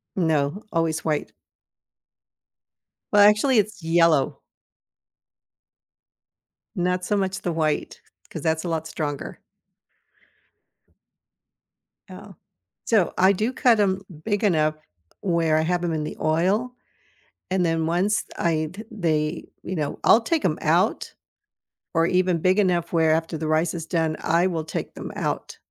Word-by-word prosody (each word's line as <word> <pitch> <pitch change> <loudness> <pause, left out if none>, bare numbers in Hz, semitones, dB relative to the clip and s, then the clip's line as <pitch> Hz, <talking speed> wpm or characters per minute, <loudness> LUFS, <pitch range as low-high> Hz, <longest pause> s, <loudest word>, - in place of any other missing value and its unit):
No, 160 +1 0
always 160 -1 0
white. 155 -2 -1 1.8
Well, 205 - +6
actually, 215 +5 +5
it's 205 -3 -2
yellow. 160 -4 +2 2.4
Not 180 0 0
so 205 +2 0
much 195 0 -2
the 175 - -2
white, 155 -2 -1 0.3
'cause - - -7
that's 160 -1 0
a 175 - -3
lot 160 -1 -2
stronger. 145 -3 -5 2.7
Oh, - - -11 0.5
so, 215 -6 +2
I 190 +1 +5
do 220 +6 -1
cut 240 -4 +3
'em 190 -2 +1 0.2
big 205 -1 -1
enough 155 -6 +2 0.5
where 170 -4 +1
I - - +2
have 175 +2 0
them 175 -2 -1
in 155 -1 -2
the 150 - -6
oil, 185 +10 +1 0.8
and 185 -1 +2
then 165 -1 0
once 180 +6 +1
I'd 165 +4 -1
they, 160 -6 -1 0.2
you 185 - -4
know, 150 -3 -3
I'll 230 - +6
take 315 +7 -1
'em - - +1
out, - - +1 0.8
or 165 -1 +3
even 180 -1 +1
big 185 +4 +2
enough 180 -4 +1
where 160 -1 +3
after 160 +1 0
the 155 0 -4
rice 160 +2 +1
is 165 -2 -5
done, 160 -2 0
I 170 +3 +2
will 165 -4 -2
take 155 - -5
them - - -7
out. - - -3
170 Hz, 135 wpm, -24 LUFS, 160-190 Hz, 2.7 s, Well